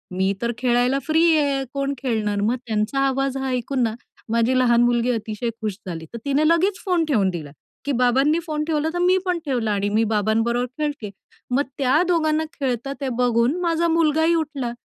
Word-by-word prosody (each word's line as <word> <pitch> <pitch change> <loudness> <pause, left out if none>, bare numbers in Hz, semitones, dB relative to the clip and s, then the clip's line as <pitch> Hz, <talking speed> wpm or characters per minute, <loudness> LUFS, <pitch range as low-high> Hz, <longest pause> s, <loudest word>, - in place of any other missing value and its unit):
मी 190 +1 +1
तर 235 0 0
खेळायला 250 +2 +2
फ्री 320 +1 +3 0.2
आहे, 280 -2 +1
कोण 275 0 -1
खेळणार?" 215 -6 -1
मग 225 +4 +1
त्यांचा 215 +5 -1
आवाज 270 0 -1
हा 265 0 -2
ऐकून 255 +1 -1
ना, 225 -1 0 0.4
माझी 235 +3 +2
लहान 240 -1 +4
मुलगी 240 0 +2
अतिशय, 225 0 -3
खुश 210 -3 -3
झाली, 165 -2 -5
तर - - -5
तिने 285 +2 +2
लगेच 365 +4 +2
फोन 350 -3 +1
ठेवून 215 -11 +2
दिला, 155 -5 -6 0.3
की 285 - -1
बाबांनी 270 +6 +3
फोन 305 -1 -2
ठेवला 310 0 0
तर 350 - -2
मी 365 +1 +4
पण 355 -2 0
ठेवला 240 -6 -1
आणि 200 0 0
मी 220 +2 +2
बाबांबरोबर 225 +4 +1
खेळते. 290 -9 -3 0.4
मग 270 +3 +3 0.2
त्या 275 +4 +3
2घांना 315 -2 +1 0.2
खेळता 265 0 -2
ते 270 - -1
बघून 245 +4 +2
माझा 340 0 +1
मुलगा 320 -1 +2
ही 335 +1 +3
उठला 285 -7 -2
260 Hz, 190 wpm, -22 LUFS, 230-305 Hz, 0.4 s, लहान